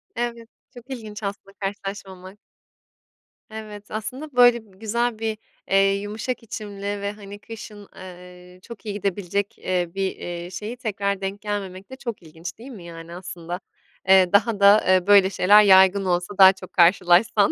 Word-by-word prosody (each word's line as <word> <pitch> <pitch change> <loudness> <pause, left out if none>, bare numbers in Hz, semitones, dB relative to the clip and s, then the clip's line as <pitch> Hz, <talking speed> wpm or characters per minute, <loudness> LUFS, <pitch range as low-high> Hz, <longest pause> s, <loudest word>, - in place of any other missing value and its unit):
Evet, 235 -1 -4 0.2
çok 245 +2 -14
ilginç 215 -4 -8
aslında 200 0 -6
karşılaşmamak. 195 -1 -7 1.1
Evet, 215 -1 -10
aslında 255 +7 -6
böyle 240 -4 +4
bi 190 - -23
güzel 230 +1 -1
bir, 220 -1 -2 0.3
eee, 195 0 +4
yumuşak 220 +4 -5
içimli 205 -2 -8 0.2
ve, 200 0 -2
hani, 205 -1 -11
kışın, 210 -2 -11
eee, 180 0 -13
çok 225 -3 -12
iyi 205 - -3
gidebilecek, 200 0 -3
eee, 180 -2 -2
bir, 195 -1 -2
eee, 175 0 -7
şeyi 215 +6 -6
tekrar 200 -4 -2
denk 195 +1 -4
gelmemek 195 -2 -5
de 260 - -8
çok 240 -7 -6
ilginç 165 +3 -9
değil 255 +4 -11
mi, 195 -7 -11
yani 170 0 -10
aslında, 175 -1 -7 0.5
eee, 190 -1 +6
daha 205 0 +3
da, 200 +2 +6
eee, 185 0 +3
böyle 200 -2 +6
şeyler 205 +3 +5
yaygın 190 0 +5
olsa 180 +2 -1
daha 190 0 +9
çok 185 -1 -13
karşılaşsan. 185 +4 +4
200 Hz, 160 wpm, -23 LUFS, 185-215 Hz, 1.1 s, daha